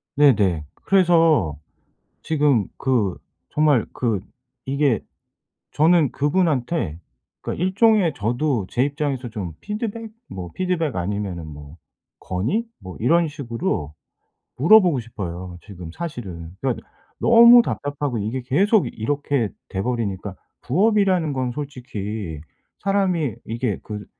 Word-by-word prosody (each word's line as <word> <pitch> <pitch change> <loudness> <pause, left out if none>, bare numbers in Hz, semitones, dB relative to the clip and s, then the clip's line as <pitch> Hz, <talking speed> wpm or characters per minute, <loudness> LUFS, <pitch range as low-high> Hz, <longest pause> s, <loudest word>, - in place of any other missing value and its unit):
네네. 105 - +4
그래서 165 - +3 0.7
지금 145 -9 +2
그 115 -9 +1 0.3
정말 150 -6 +3
그 115 -5 0 0.5
이게 140 -4 +1 0.7
저는 160 -2 +4
그분한테 145 - 0 0.4
그러니까 170 - -4
일종의 195 -3 +3
저도 120 0 -1
제 120 - 0
입장에서 140 -3 -2
좀 100 -7 -5
피드백, 220 +1 -4 0.2
뭐 90 -2 -7
피드백 180 - -1
아니면은 90 -2 -3
뭐 75 0 -11 0.4
건의 110 - -1 0.2
뭐 95 -1 -9
이런 165 +7 +3
식으로 115 - -3 0.6
물어보고 175 - +5
싶어요 90 -5 -7
지금 90 -5 -9
사실은. 95 - -6
그러니까 130 -3 -2 0.3
너무 235 +1 +8
답답하고 145 - -3
이게 110 +6 -2
계속 190 - +2
이렇게 140 -1 -1 0.2
돼 95 - -3
버리니까 105 -5 -3 0.3
부업이라는 185 - +2
건 130 -2 -1
솔직히 110 - -5 0.4
사람이 185 - 0
이게 115 -2 -2
그 105 -2 -7
130 Hz, 255 characters per minute, -22 LUFS, 100-165 Hz, 0.7 s, 너무